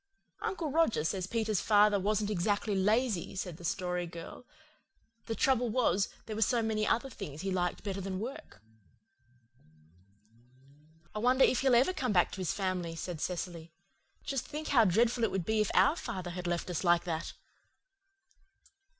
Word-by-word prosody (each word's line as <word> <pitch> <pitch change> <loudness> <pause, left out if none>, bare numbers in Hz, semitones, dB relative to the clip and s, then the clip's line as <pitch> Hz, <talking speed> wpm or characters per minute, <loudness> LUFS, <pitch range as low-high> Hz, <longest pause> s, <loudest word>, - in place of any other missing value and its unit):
"Uncle 325 -6 -2
Roger 315 - +2
says 185 +3 -2
Peter's 220 -2 0
father 210 -1 +4
wasn't 210 +1 0
exactly 205 +2 0
lazy," 210 0 +1
said 180 -4 -4
the 175 - -13
Story 180 0 -2
Girl. 170 +8 -10 0.8
"The 225 - -2
trouble 250 -2 +2
was, 210 -5 +2 0.2
there 215 - -5
were 220 - -3
so 230 +2 +2
many 215 -1 0
other 240 +4 +1
things 150 - -7
he 195 0 -2
liked 180 -1 -1
better 195 -1 -3
than 190 0 -4
work." 220 - -8 2.5
"I 215 - -3
wonder 255 +4 +4
if 255 - +2
he'll 265 -2 +4
ever 260 +10 +4
come 255 - -1
back 180 - +3
to 190 - -6
his 180 - 0
family," 185 -4 -2
said 165 -1 -5
Cecily. 170 -2 -4 0.5
"Just 270 -3 -3
think 305 +1 -5
how 240 -6 +5
dreadful 230 +5 +2
it 225 - +3
would 190 -3 -2
be 220 -1 +1
if 210 - 0
OUR 285 - +5
father 185 - -5
had 180 0 -5
left 175 +1 -2
us 175 - -2
like 175 -1 +4
that!" 165 -2 -4
205 Hz, 165 wpm, -31 LUFS, 180-235 Hz, 2.5 s, how